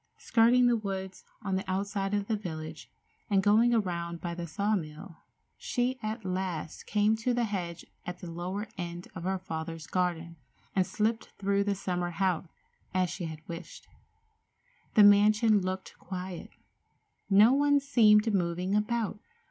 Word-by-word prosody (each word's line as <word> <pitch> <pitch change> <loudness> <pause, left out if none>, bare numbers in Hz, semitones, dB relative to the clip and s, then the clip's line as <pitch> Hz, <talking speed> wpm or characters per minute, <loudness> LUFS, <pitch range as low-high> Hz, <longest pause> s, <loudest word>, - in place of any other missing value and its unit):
Skirting 245 +2 +4
the 240 -1 +4
woods 190 -3 -4 0.2
on 195 -2 -1
the 190 0 -4
outside 195 +1 -1
of 205 -1 -1
the 225 - +1
village, 160 -5 -7 0.4
and 195 -2 +3
going 220 +4 +5
around 170 -6 -1
by 170 0 -4
the 170 0 -5
saw 205 +6 0
mill, 160 0 -6 0.4
she 255 +1 -1
at 215 -1 -4
last 180 -4 -3
came 210 +1 +3
to 240 +2 0
the 245 - +1
hedge 180 -6 -4 0.2
at 180 0 -6
the 175 -1 -8
lower 185 +5 -4
end 175 0 -5
of 170 -1 -7
her 190 +1 0
father's 165 -3 -6
garden, 170 -2 -2 0.4
and 185 -2 +2
slipped 225 +1 -1
through 200 0 +1
to - - -10
the 200 -1 +1
summer 180 -2 -2
house, 180 0 0 0.5
as 185 -2 +2
she 180 - -4
had 160 -1 -8
wished. 170 +1 -8 1.1
The 215 - +8
mansion 210 +1 +6
looked 185 +1 -4
quiet. 185 -2 -6 0.8
No 210 +5 +7
one 285 +1 +4
seemed 220 -6 +4
moving 180 0 0
about. 210 0 0
195 Hz, 155 wpm, -29 LUFS, 175-215 Hz, 1.1 s, The